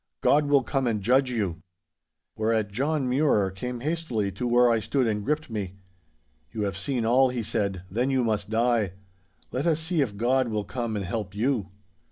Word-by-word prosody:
God 145 0 +4
will 140 -2 +4
come 135 0 -1
and 110 -3 0
judge 130 +6 +3
you!" 100 -9 -2 0.7
'Whereat 110 -1 0
John 140 +4 0
Mure 125 -7 +2
came 120 +5 -5
hastily 135 -10 -1
to 95 +6 -3
where 120 +1 +5
I 115 -1 +3
stood 130 +4 0
and 105 -2 -1
gripped 150 +6 -1
me. 100 -4 -4 0.8
"You 110 - -3
have 100 -2 -2
seen 120 +4 -1
all," 130 +3 +4
he 125 -2 -3
said, 100 -4 -2
"then 120 +8 0
you 130 -2 +2
must 105 -3 -1
die. 115 -4 +1 0.6
Let 135 +6 -1
us 160 -2 +2
see 160 0 0
if 105 -7 -2
God 130 +3 +2
will 105 -2 -2
come 120 -3 -3
and 100 -2 -2
help 100 0 -4
you!" 110 -3 0
120 Hz, 190 wpm, -26 LUFS, 105-130 Hz, 0.8 s, where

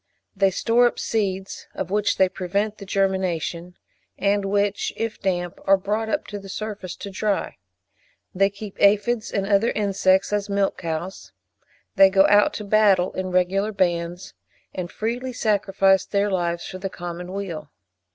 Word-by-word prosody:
They 195 0 +3
store 235 +5 +3
up - - -3
seeds, 195 -3 -2
of 185 - -4
which 210 0 +1
they 190 - +5
prevent 200 +4 -2
the 200 - -9
germination, 180 -3 -1 0.4
and 200 +1 +1
which, 200 0 0
if 225 -1 -3
damp, 175 -3 -2
are 195 0 +5
brought 210 +3 -2
up - - -1
to 205 - -5
the 195 0 -11
surface 205 -3 -5
to 200 - -8
dry. 205 +1 -2 0.8
They 195 +1 +3
keep 200 0 -10
aphides 210 +3 +3
and 195 -1 -1
other 200 +3 +3
insects 195 -1 +1
as 205 0 -1
milch 200 -1 0
cows. 160 - -5 0.6
They 195 0 +8
go 195 0 +5
out 205 0 +5
to 210 - -5
battle 200 -3 +3
in 185 0 -3
regular 185 +3 +1
bands, 175 -2 -1 0.4
and 180 -1 -5
freely 245 +4 -3
sacrifice 195 -3 +2
their 200 0 0
lives 170 -2 -1
for 185 - -7
the 195 - -3
common 175 0 -7
weal. 170 -7 -5
195 Hz, 160 wpm, -23 LUFS, 185-205 Hz, 0.8 s, They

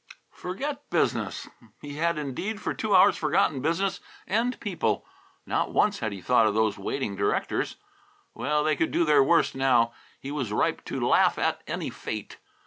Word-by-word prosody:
"Forget 280 +11 -5
business!" - - 0 0.3
He 145 0 -8
had 170 0 +1
indeed 150 - -4
for - - -2
two 215 -3 0
hours 185 - +7
forgotten 135 - +1
business 185 +6 0 0.3
and 230 +5 0
people. - - -1 0.4
Not - - -1
once 205 -1 +2
had 110 -2 -2
he 100 -2 -7
thought 115 +2 +4
of 105 - 0
those 110 -1 +2
waiting 105 +1 -3
directors. 100 +1 -1 0.6
Well, 150 +1 0
they 155 0 +2
could 160 - 0
do 170 - +1
their 150 -3 +5
worst, 170 +5 +3
now. 125 -3 +3 0.3
He 135 - -7
was 130 -8 -3
ripe 105 - 0
to - - -4
laugh - - +4
at - - 0
any - - -3
fate. - - -6
150 Hz, 170 wpm, -27 LUFS, 120-185 Hz, 0.6 s, hours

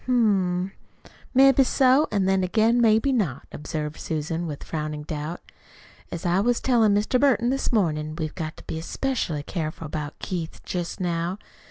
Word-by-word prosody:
"Hm 195 -7 +2
m; - - -25 0.2
maybe 270 +1 +6
so, 265 +3 +4
an' 200 -2 +1
then 190 0 +2
again 225 +6 +3
maybe 225 +4 +4
not," 195 - -1
observed 150 0 -5
Susan, 160 +2 -3
with 145 -3 -6
frowning 150 -1 -4
doubt. 155 +2 -5 0.7
"As 170 - -5
I 175 +2 +3
was 240 +3 +2
tellin' 225 -5 +3
Mr. 215 +5 +2
Burton 255 -3 +3
this 270 - -1
mornin' 155 -8 0
we've 155 -2 -4
got 155 -2 -5
to - - -12
be 160 - -5
'specially 170 - -2
careful 160 0 -4
about 150 -1 -5
Keith 170 -4 -5
jest 175 -2 -4
now. 175 +1 -1
180 Hz, 165 wpm, -25 LUFS, 155-230 Hz, 0.7 s, maybe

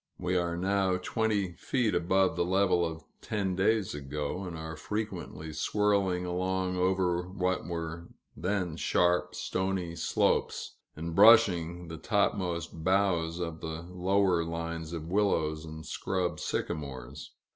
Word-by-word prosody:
We 90 +1 -1
are 85 -1 0
now 95 0 +1
twenty 100 -1 0
feet 120 -6 0
above 95 +2 +2
the - - +1
level 90 -1 +3
of 80 -2 -3 0.2
ten 100 -4 -1
days 105 +1 +2
ago, 75 +6 -4
and 85 -3 -6
are 80 0 -6
frequently 85 -5 -5
swirling 95 +1 +1
along 90 +1 -1
over 90 -1 +1
what 95 -1 -1
were 85 0 -4 0.3
then 90 0 -1
sharp, 90 +1 +2
stony 95 -2 -2
slopes, - - 0 0.2
and 85 +2 -5
brushing 90 -5 +6
the 80 0 -6
topmost 85 -4 -1
boughs 90 -3 +2
of 85 -2 -4
the 80 +1 -5
lower 90 -1 +2
lines 85 -1 -4
of 85 0 -5
willows 80 -6 +1
and 80 0 -8
scrub 95 -2 -2
sycamores. 70 -2 -4
90 Hz, 130 wpm, -30 LUFS, 80-95 Hz, 0.3 s, brushing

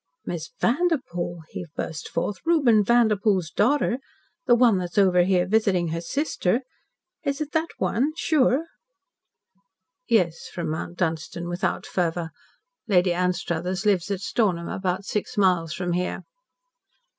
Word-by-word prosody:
"Miss 160 -4 -4
Vanderpoel," 240 - 0
he 175 - -6
burst 160 -1 -5
forth, 190 +4 -2
"Reuben 270 -11 +4
Vanderpoel's 210 -6 +2
daughter! 255 +1 +2 0.5
The 240 - +6
one 235 -5 +4
that's 180 +2 -5
over 185 -3 +5
here 180 0 +2
visiting 190 -5 +2
her 165 +1 -3
sister. 240 - 0 0.6
Is 280 0 -1
it 305 -1 -4
that 320 +1 +1
one 270 +8 0
sure?" 290 0 +2 1.4
"Yes," 180 -9 +1
from 170 -3 -4
Mount 170 +2 -5
Dunstan 170 0 -2
without 175 +1 -2
fervour. 170 -2 -1 0.6
"Lady 180 -3 +3
Anstruthers 180 +1 -1
lives 190 -3 +2
at 200 -2 -2
Stornham, 185 -6 0
about 190 0 -2
six 210 0 -3
miles 180 -5 +3
from 175 +1 -2
here." 180 +1 -2
185 Hz, 130 wpm, -25 LUFS, 175-235 Hz, 1.4 s, The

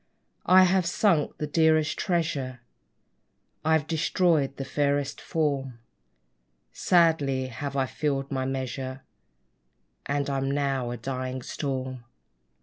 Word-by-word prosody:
I 185 +1 +8
have 185 -1 +3
sunk 175 -4 +1
the 150 - -2
dearest 155 0 +3
treasure 140 -8 -2 1.0
I've 160 -2 +2
destroyed 160 -3 +1
the 135 - -4
fairest 140 0 -1
form: 140 -6 -1 1.0
Sadly 155 -7 +2
have 140 +3 -5
I 135 - +2
filled 140 +1 -2
my 130 -1 -1
measure; 130 0 -4 1.0
And 140 0 -1
I'm 135 -1 -1
now 135 -3 0
a 120 - -4
dying 130 +1 -4
Storm! 130 -3 -4
140 Hz, 110 wpm, -27 LUFS, 130-155 Hz, 1.0 s, I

